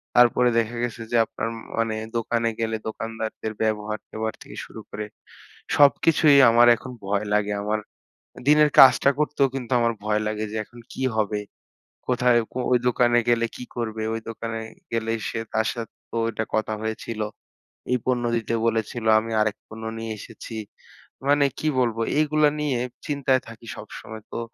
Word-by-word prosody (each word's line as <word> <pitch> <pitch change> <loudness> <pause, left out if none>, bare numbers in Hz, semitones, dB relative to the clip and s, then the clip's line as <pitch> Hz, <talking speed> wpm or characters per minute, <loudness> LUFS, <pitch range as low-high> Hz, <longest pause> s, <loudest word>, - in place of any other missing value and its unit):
তারপরে 125 0 +5
দেখা 115 +1 -2
গেছে 120 -1 -3
যে 120 - +3
আপনার 115 - -4
ম - - -8 0.2
মানে 115 -1 +1 0.2
দোকানে 115 0 0
গেলে 115 0 0
দোকানদারদের 110 0 -4
ব্যবহার-ট্যাঁবহার 110 0 -2
থেকে - - -11
শুরু - - -10
করে 105 - -5 0.7
সবকিছুই 145 +1 +5
আমার 120 +1 +6
এখন 130 +3 -9
ভয় 100 +1 0
লাগে। 105 0 +2
আমার 105 +1 0 0.7
দিনের 150 0 +6
কাজটা 135 +1 +8
করতেও 150 -2 +2
কিন্তু 130 -2 -5
আমার 115 0 +2
ভয় 105 0 +1
লাগে, 105 0 -2
যে 110 - -4
এখন 120 +2 -15
কি - - -5
হবে? 105 -1 0 0.7
কোথায় 125 -1 +4
কো - - -5
ওই 125 - +6
দোকানে 120 0 +3
গেলে 115 -1 +3
কি - - -7
করবে? 110 -2 -3
ওই 115 - -3
দোকানে 115 0 -4 0.3
গেলেই 115 0 0
সে - - -3 0.2
তার 110 0 +2
সাথে 115 -3 -7 0.2
তো - - -6
ওইটা 110 -1 -2
কথা 110 0 0
হয়েছিল। 110 0 -4 0.7
এই 125 - +4
পণ্য 125 -1 +1
দিতে 115 0 -3
বলেছিল, 115 +1 -1
আমি 115 +1 -5
আরেক 110 -1 +1
পণ্য 110 +1 -9
নিয়ে 115 0 -4
এসেছি। 115 +2 -9 0.7
মানে 145 0 +5
কি 155 - -1
বলব? 120 -3 +1 0.2
এইগুলা 155 0 +4
নিয়ে 140 -5 0 0.3
চিন্তায় 135 -3 +1
থাকি 115 +1 -12
সবসময়। 110 0 -9
তো - - -3
115 Hz, 160 wpm, -24 LUFS, 110-125 Hz, 0.7 s, কাজটা